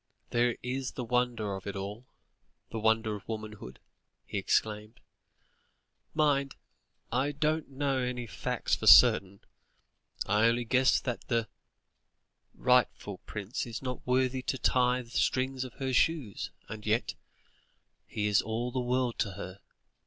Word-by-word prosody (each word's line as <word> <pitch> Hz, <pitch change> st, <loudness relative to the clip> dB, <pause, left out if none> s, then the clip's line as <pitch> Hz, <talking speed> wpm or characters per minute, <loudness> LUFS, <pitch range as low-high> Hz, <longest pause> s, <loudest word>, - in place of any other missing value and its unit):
"There 120 Hz, 0 st, +2 dB
is 130 Hz, +1 st, -3 dB
the 125 Hz, -, -4 dB
wonder 120 Hz, -3 st, 0 dB
of 95 Hz, +1 st, -8 dB
it 100 Hz, -, -4 dB
all, 100 Hz, +6 st, -6 dB, 0.6 s
the 115 Hz, -, -3 dB
wonder 110 Hz, 0 st, +2 dB
of 100 Hz, -, -11 dB
womanhood," 110 Hz, -, -6 dB, 0.5 s
he -, -, -3 dB
exclaimed; 105 Hz, +1 st, -1 dB, 1.2 s
"mind, 140 Hz, -3 st, +2 dB, 0.6 s
I 130 Hz, +4 st, +1 dB
don't 155 Hz, +1 st, 0 dB
know 135 Hz, -1 st, -1 dB
any 125 Hz, -1 st, -2 dB
facts 105 Hz, -, -1 dB
for -, -, -4 dB
certain. 100 Hz, 0 st, +7 dB, 0.8 s
I 105 Hz, +2 st, +3 dB
only 120 Hz, +1 st, +1 dB
guess 130 Hz, +2 st, +4 dB
that 125 Hz, -3 st, -4 dB
the 115 Hz, -3 st, 0 dB, 1.1 s
rightful 125 Hz, -6 st, +1 dB
prince 105 Hz, +3 st, -4 dB
is 115 Hz, +2 st, -6 dB
not 125 Hz, -1 st, -5 dB
worthy 130 Hz, 0 st, +2 dB
to 130 Hz, -, -2 dB
tie 125 Hz, 0 st, +2 dB
the 115 Hz, -, -18 dB
strings 130 Hz, 0 st, 0 dB
of 130 Hz, -, -8 dB
her 130 Hz, -1 st, -3 dB
shoes, 140 Hz, -, +1 dB, 0.2 s
and 110 Hz, -1 st, -8 dB
yet 110 Hz, +2 st, 0 dB, 0.9 s
he 105 Hz, -, -2 dB
is 105 Hz, -1 st, +4 dB
all 115 Hz, +3 st, -3 dB
the 130 Hz, -, -2 dB
world 125 Hz, -1 st, 0 dB
to 100 Hz, -4 st, 0 dB
her. 95 Hz, +2 st, -8 dB
120 Hz, 140 wpm, -30 LUFS, 110-130 Hz, 1.2 s, certain